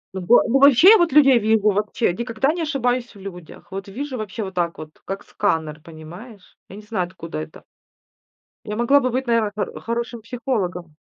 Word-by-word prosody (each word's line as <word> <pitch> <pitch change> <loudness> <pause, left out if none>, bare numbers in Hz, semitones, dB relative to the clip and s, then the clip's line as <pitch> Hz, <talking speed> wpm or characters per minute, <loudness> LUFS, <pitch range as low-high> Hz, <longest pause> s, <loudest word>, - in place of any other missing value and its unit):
Ну 190 - -4
во 240 - +6
ну 270 +3 +2
вообще 280 - +7
я 450 - +8
вот 345 -3 +2
людей 270 -4 +6
вижу. 215 -1 +2
Вообще 210 -1 -1
никогда 235 - -1
не 345 - -4
ошибаюсь 250 -5 -1
в - - -14
людях. 180 -4 -11
Вот 195 +1 -6
вижу 260 +6 -6
вообще 215 +1 -5
вот 190 -1 -7
так 170 -2 -2
вот, 155 0 -12
как 195 +1 -5
сканер, 160 -6 -2
понимаешь. 175 +7 -13
Я 195 - -10
не 210 - -11
знаю 210 -5 -3
откуда 170 - -8
это. 80 0 -9 1.0
Я 210 - -4
могла 255 +5 +4
бы 255 - 0
быть, 255 +1 -3
наверно, 230 -3 +1
хор 210 - -4
хорошим 235 0 -4
психологом. 205 - -4
215 Hz, 195 wpm, -21 LUFS, 185-250 Hz, 1.0 s, я